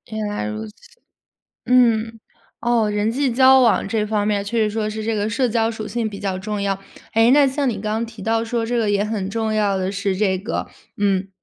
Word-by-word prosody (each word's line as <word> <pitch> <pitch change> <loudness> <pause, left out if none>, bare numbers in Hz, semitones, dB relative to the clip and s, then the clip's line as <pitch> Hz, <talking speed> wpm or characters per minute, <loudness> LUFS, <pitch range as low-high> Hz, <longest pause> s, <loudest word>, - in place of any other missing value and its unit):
原 215 - -2
来 205 - -3
如 105 +1 -4
此。 105 - -13 0.9
嗯， 230 -2 +3 0.4
哦， 235 -3 +1
人 210 +1 0
际 270 +2 0
交 265 +2 +6
往 235 -5 +3
这 220 0 0
方 210 -1 0
面 205 -1 0
确 230 +3 -2
实 215 -1 +2
说 215 0 -2
是 215 0 -5
这 225 0 -1
个 210 0 -1
社 255 +1 +1
交 225 0 +1
属 220 -2 -6
性 235 -2 -2
比 200 -1 -8
较 190 -2 -3
重 210 +2 -4
要。 195 -1 -1 0.4
诶， 225 +2 +5
那 285 0 +6
像 270 0 0
你 210 -4 -2
刚 215 +2 -1
提 225 -3 -11
到 225 +2 0
说 230 0 -2
这 240 +1 -1
个 215 -2 +1
也 205 0 +1
很 210 -3 -3
重 220 0 -1
要 205 -2 +1
的 190 0 -1
是 195 -1 -2
这 190 -2 +1
个 210 +5 -4 0.3
嗯， 195 -1 +1
215 Hz, 240 characters per minute, -21 LUFS, 205-230 Hz, 0.9 s, 交